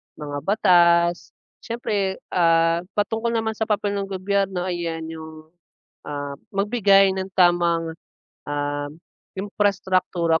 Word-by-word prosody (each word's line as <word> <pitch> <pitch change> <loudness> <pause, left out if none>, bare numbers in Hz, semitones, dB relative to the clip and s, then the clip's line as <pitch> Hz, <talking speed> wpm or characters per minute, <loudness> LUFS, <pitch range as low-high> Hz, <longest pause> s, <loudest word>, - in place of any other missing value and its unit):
mga 145 -1 -6
batas. 175 -2 +3 0.2
Siyempre, 210 -5 -2 0.2
ah, 165 -1 +3 0.2
patungkol 225 +3 -1
naman 220 0 0
sa 220 0 -3
papel 205 -1 0
ng 200 -1 -3
gobyerno 195 -1 -1
ayan 170 -3 -3
yung, 160 0 -10 0.5
ah, 145 -1 -5 0.2
magbigay 195 -2 +3
ng 190 0 -4
tamang, 170 -2 +3 0.5
um, 145 0 -2 0.5
imprastraktura 190 -4 0
185 Hz, 105 wpm, -23 LUFS, 165-200 Hz, 0.5 s, batas